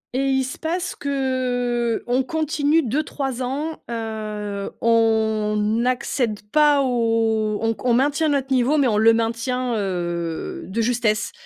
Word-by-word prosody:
Et 270 Hz, +2 st, 0 dB
il 265 Hz, 0 st, +2 dB
se 260 Hz, -, -6 dB
passe 345 Hz, +3 st, -2 dB
qu'on 250 Hz, -3 st, -1 dB
continue 310 Hz, +2 st, +1 dB
2-3 270 Hz, 0 st, -2 dB
ans. 290 Hz, +5 st, -3 dB
Heu, 215 Hz, -3 st, -4 dB
on 220 Hz, -2 st, +2 dB
n'accède 230 Hz, +1 st, 0 dB
pas 295 Hz, -2 st, +4 dB
au 225 Hz, -3 st, +1 dB
on 225 Hz, 0 st, +1 dB
con 245 Hz, +2 st, -1 dB
on -, -, +4 dB
maintient 290 Hz, +5 st, +2 dB
notre 275 Hz, -2 st, -1 dB
niveau 260 Hz, +4 st, +3 dB
mais 280 Hz, -3 st, +3 dB
on 215 Hz, -3 st, +1 dB
le 225 Hz, +1 st, +6 dB
maintient, 235 Hz, +2 st, -1 dB
heu, 175 Hz, -4 st, -3 dB
de 215 Hz, +5 st, -2 dB
justesse, 225 Hz, -2 st, 0 dB
240 Hz, 135 wpm, -22 LUFS, 220-270 Hz, -, le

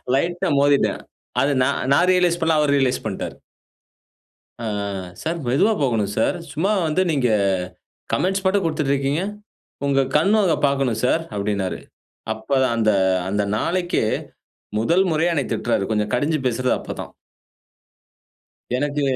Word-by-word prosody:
லைட்டா 175 Hz, +5 st, 0 dB
மோதிட்டேன். 145 Hz, -1 st, +2 dB, 0.4 s
அது 140 Hz, -, +2 dB
நான்-நான் 140 Hz, +5 st, +2 dB
ரியலைஸ் 180 Hz, -2 st, +2 dB
பண்ணல, 160 Hz, -1 st, +3 dB
அவரு 145 Hz, -1 st, +2 dB
ரியலைஸ் 130 Hz, -4 st, 0 dB
பண்ணிட்டாரு. 100 Hz, -3 st, -4 dB, 1.3 s
அ -, -, -2 dB, 0.6 s
"சார் 165 Hz, +2 st, -2 dB
மெதுவா 175 Hz, -, +3 dB
போகணும் 110 Hz, -6 st, 0 dB
சார். 115 Hz, -, +2 dB, 0.2 s
சும்மா 180 Hz, +7 st, 0 dB, 0.2 s
வந்து 155 Hz, +4 st, +1 dB
நீங்க 135 Hz, -5 st, +1 dB, 0.8 s
கமெண்ட்ஸ் 190 Hz, +1 st, 0 dB
மட்டும் 195 Hz, +1 st, +2 dB
குடுத்துட்டு 155 Hz, -4 st, 0 dB
இருக்கீங்க? 140 Hz, +5 st, 0 dB, 0.6 s
உங்க 135 Hz, -1 st, +3 dB, 0.2 s
கண்ணு 195 Hz, +8 st, +3 dB
அத 175 Hz, -, +3 dB
பாக்கணும் 135 Hz, -5 st, 0 dB
சார்." 165 Hz, +6 st, +2 dB
அப்டின்னாரு. 100 Hz, -2 st, -2 dB, 0.5 s
அப்பதான் 130 Hz, +2 st, 0 dB
அந்த-அந்த 95 Hz, -2 st, +1 dB
நாளைக்கே 175 Hz, -2 st, 0 dB, 0.8 s
முதல் 175 Hz, +11 st, +3 dB
முறையா 165 Hz, +3 st, +2 dB
என்னய 140 Hz, -5 st, -1 dB
திட்றாரு, 120 Hz, -4 st, 0 dB
கொஞ்சம் 105 Hz, -1 st, 0 dB
கடிஞ்சு 150 Hz, +5 st, 0 dB
பேசுறது 125 Hz, +1 st, 0 dB
அப்ப -, -, -6 dB
தான். -, -, -9 dB, 1.6 s
எனக்கு 145 Hz, +2 st, -1 dB
140 Hz, 125 wpm, -22 LUFS, 115-170 Hz, 1.6 s, பண்ணல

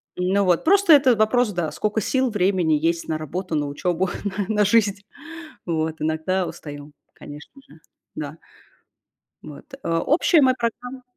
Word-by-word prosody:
Ну, 185 Hz, +3 st, +1 dB
вот 180 Hz, -2 st, +2 dB
просто 390 Hz, 0 st, +5 dB
это 265 Hz, -4 st, +5 dB
вопрос, 215 Hz, +2 st, +2 dB
да, 175 Hz, -5 st, -3 dB
скока 210 Hz, +7 st, -2 dB
сил, 260 Hz, +5 st, 0 dB
времени 185 Hz, -6 st, +1 dB
есть 165 Hz, +3 st, 0 dB
на 155 Hz, -, -2 dB
работу, 165 Hz, +3 st, -5 dB
на 145 Hz, -1 st, -1 dB
учёбу, 175 Hz, +5 st, -2 dB
на 200 Hz, 0 st, -3 dB
на 210 Hz, 0 st, +3 dB
жизнь. 205 Hz, -2 st, +2 dB, 0.6 s
Вот 160 Hz, -2 st, -2 dB
иногда 160 Hz, +4 st, -1 dB
устаю, 145 Hz, 0 st, -9 dB, 0.2 s
конечно 145 Hz, 0 st, -12 dB, 0.2 s
же. 155 Hz, -, -17 dB, 0.4 s
Да. 150 Hz, +1 st, -7 dB, 1.0 s
Вот, -, -, -12 dB
э, -, -, -5 dB
общая 295 Hz, -, +3 dB
моя 260 Hz, -2 st, +4 dB
программа 245 Hz, +2 st, -5 dB
185 Hz, 150 wpm, -22 LUFS, 160-230 Hz, 1.0 s, просто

